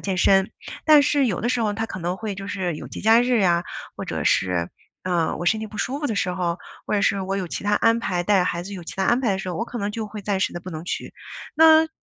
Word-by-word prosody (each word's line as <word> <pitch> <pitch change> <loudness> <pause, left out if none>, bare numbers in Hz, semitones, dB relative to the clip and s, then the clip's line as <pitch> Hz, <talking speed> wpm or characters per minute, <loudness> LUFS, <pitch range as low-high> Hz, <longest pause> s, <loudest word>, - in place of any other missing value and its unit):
健 190 -2 -2
身。 195 +1 +4 0.3
但 305 -2 +7
是 285 0 +2
有 200 -7 -1
的 240 - -1
时 245 -1 +1
候 210 -2 +1
它 225 +2 -3
可 190 - -7
能 175 +1 -2
会 215 -2 -4
就 195 +1 -7
是 185 -5 -2
有 - - -8
节 - - -8
假 225 +2 +5
日 245 -2 +2
啊， 175 -1 +2 0.3
或 - - -5
者 - - -4
是， 90 -2 +1 0.4
呃， 175 -3 0
我 175 - -4
身 220 - +3
体 220 - -5
不 210 0 -10
舒 270 +6 -2
服 295 - -2
的 225 - -2
时 200 - 0
候， 180 -1 -2 0.3
或 - - -3
者 210 - +2
是 195 0 +1
我 195 +1 -2
有 185 -3 -4
其 - - -5
他 205 - +1
安 230 +2 +3
排 180 -6 -1
带 190 0 +3
孩 170 -1 -2
子 200 +3 -7
有 180 -3 -8
其 - - -8
他 190 - -1
安 240 +5 +3
排 230 -5 +2
的 190 - -2
时 190 - -5
候， 180 - -3
我 230 - -1
可 240 - -7
能 205 -1 -2
就 220 +1 -4
会 210 0 -8
暂 200 -1 -1
时 190 - 0
地 175 - -6
不 180 - -10
能 160 -2 -6
去。 - - -5 0.4
那 320 0 +6
200 Hz, 320 characters per minute, -23 LUFS, 180-225 Hz, 0.4 s, 但